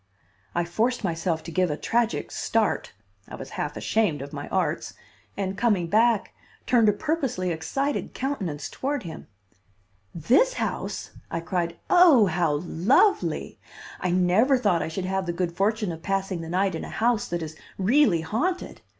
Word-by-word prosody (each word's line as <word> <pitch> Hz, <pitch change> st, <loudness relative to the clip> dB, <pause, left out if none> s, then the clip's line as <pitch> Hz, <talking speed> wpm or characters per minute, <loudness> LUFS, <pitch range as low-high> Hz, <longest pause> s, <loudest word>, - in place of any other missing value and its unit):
I 175 Hz, 0 st, +1 dB
forced 225 Hz, +8 st, 0 dB
myself 165 Hz, -2 st, -1 dB
to 165 Hz, -, -7 dB
give 185 Hz, +1 st, +1 dB
a 150 Hz, -, -2 dB
tragic 235 Hz, -1 st, 0 dB
start -, -, 0 dB, 0.4 s
(I -, -, -7 dB
was -, -, -9 dB
half -, -, -4 dB
ashamed 180 Hz, -11 st, 0 dB
of 140 Hz, -, -10 dB
my -, -, -6 dB
arts), -, -, -1 dB, 0.4 s
and, 195 Hz, -1 st, -2 dB
coming 205 Hz, -4 st, +2 dB
back, 220 Hz, +4 st, +2 dB, 0.3 s
turned 230 Hz, -4 st, +4 dB
a -, -, +6 dB
purposely 260 Hz, -, -1 dB
excited 270 Hz, -, -2 dB
countenance 195 Hz, -, -3 dB
toward 285 Hz, 0 st, -3 dB
him. 165 Hz, -3 st, -8 dB, 0.9 s
"This 255 Hz, -, +3 dB
house!" -, -, -3 dB, 0.2 s
I 165 Hz, -, -2 dB
cried. 170 Hz, -1 st, -2 dB
"Oh, 335 Hz, -, +7 dB
how 170 Hz, -3 st, +1 dB
lovely! 235 Hz, -, +2 dB, 0.4 s
I 180 Hz, -, -1 dB
never 185 Hz, +9 st, +3 dB
thought 200 Hz, -8 st, +2 dB
I -, -, -2 dB
should 180 Hz, +3 st, -4 dB
have 190 Hz, 0 st, -1 dB
the 170 Hz, -, -1 dB
good 170 Hz, 0 st, -2 dB
fortune 210 Hz, 0 st, 0 dB
of 165 Hz, -1 st, -8 dB
passing 195 Hz, -2 st, -2 dB
the 165 Hz, -, -7 dB
night 190 Hz, +2 st, +1 dB
in 160 Hz, -, -4 dB
a -, -, -7 dB
house 230 Hz, -1 st, +1 dB
that 175 Hz, -1 st, -3 dB
is 155 Hz, 0 st, -7 dB, 0.2 s
really 205 Hz, -, +3 dB
haunted. 310 Hz, -, -2 dB
190 Hz, 165 wpm, -25 LUFS, 170-235 Hz, 0.9 s, Oh